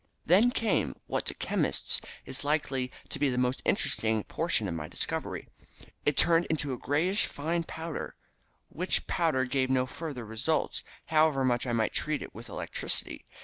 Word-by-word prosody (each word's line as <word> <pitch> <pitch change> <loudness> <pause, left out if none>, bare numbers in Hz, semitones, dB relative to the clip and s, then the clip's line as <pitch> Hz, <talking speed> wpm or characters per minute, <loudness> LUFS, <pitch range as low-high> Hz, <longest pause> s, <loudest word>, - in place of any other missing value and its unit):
"Then 200 +8 +6
came 220 - 0
what - - -2
to - - -1
chemists - - +1 0.2
is 130 +1 -6
likely 140 -4 0 0.2
to - - -5
be 145 -1 +3
the 125 - -1
most 125 +1 +1
interesting 110 -1 +1
portion 160 -10 0
of 90 - -2
my 80 -2 -4
discovery. - - -3 0.6
It 145 - +3
turned 170 0 +4
to 145 -3 -2
a - - -4
greyish 175 +8 +2
fine 165 +3 -2
powder, 160 0 -5 0.5
which 180 +4 +2
powder 155 -7 +1
gave 130 0 +1
no 130 -1 +3
further 135 -3 -6
results, 120 +9 -1 0.2
however 155 -4 +3
much 125 0 +1
I 120 - 0
might 110 -2 +1
treat 155 -1 0
it - - -10
with - - -9
electricity. - - -3
140 Hz, 165 wpm, -30 LUFS, 125-160 Hz, 0.6 s, Then